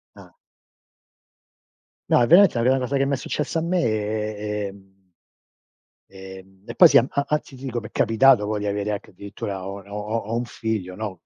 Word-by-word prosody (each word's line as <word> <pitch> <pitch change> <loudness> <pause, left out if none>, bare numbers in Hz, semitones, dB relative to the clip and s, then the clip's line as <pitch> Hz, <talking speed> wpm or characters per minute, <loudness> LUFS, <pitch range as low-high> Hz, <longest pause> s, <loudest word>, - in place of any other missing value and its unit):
Ah. - - -15 1.8
No, 120 - +4
veramente 185 0 +6
la 120 - 0
prima 130 +3 +3
cosa 130 +2 -2
che 135 - +1
mi 140 - -1
è - - +3
successa 150 +4 -3
a - - -3
me 175 +2 0
è 105 -1 -2
ehm 95 -1 -19 1.2
Ehm, 95 0 -13
e - - -8
poi, 175 - +9
sì, - - +5
a 120 - +4
anzi, 140 0 -2
ti 130 - -13
dico, 120 -2 -3
mi 110 - -9
è - - -20
capitato 115 -1 +4
poi 105 0 -2
di 105 - -4
avere 100 +1 -2
anche 105 - -6
addirittura 100 0 -7
ho 100 +1 -7
n 100 - -19
ho 100 - -7
ho 105 +2 -3
ho 115 +1 -4
un 120 - -2
figlio, 110 -6 -4
no, 105 -4 -6
110 Hz, 205 wpm, -23 LUFS, 100-130 Hz, 1.8 s, poi